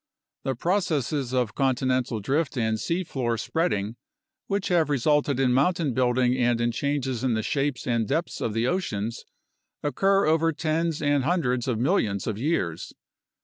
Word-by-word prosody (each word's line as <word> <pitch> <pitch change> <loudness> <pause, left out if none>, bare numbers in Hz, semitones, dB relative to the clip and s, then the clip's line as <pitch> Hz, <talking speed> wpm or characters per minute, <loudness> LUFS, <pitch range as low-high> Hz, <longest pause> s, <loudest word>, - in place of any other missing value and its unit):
The 135 - -2
processes 150 - 0
of 125 -4 0
continental 130 -3 0
drift 140 +6 -1
and 110 -2 0
sea 170 +8 -1
floor 120 -7 -2
spreading, 115 - -1 0.5
which 200 -1 -1
have 170 -4 +3
resulted 145 0 +2
in 130 -2 +3
mountain 150 +1 +2
building 125 0 +2
and 120 -1 +2
in 120 0 +1
changes 135 -1 -2
in 125 -3 +1
the 110 - -1
shapes 140 0 -1
and 115 -3 0
depths 165 - -2
of 110 - -2
the 115 +1 +1
oceans, 115 - -2 0.6
occur 195 +8 +2
over 160 +1 +3
tens 160 +1 -1
and 145 -2 +2
hundreds 125 -7 0
of 125 -4 0
millions 110 - +1
of 110 -2 -3
years. 115 - -2
130 Hz, 155 wpm, -26 LUFS, 120-160 Hz, 0.6 s, have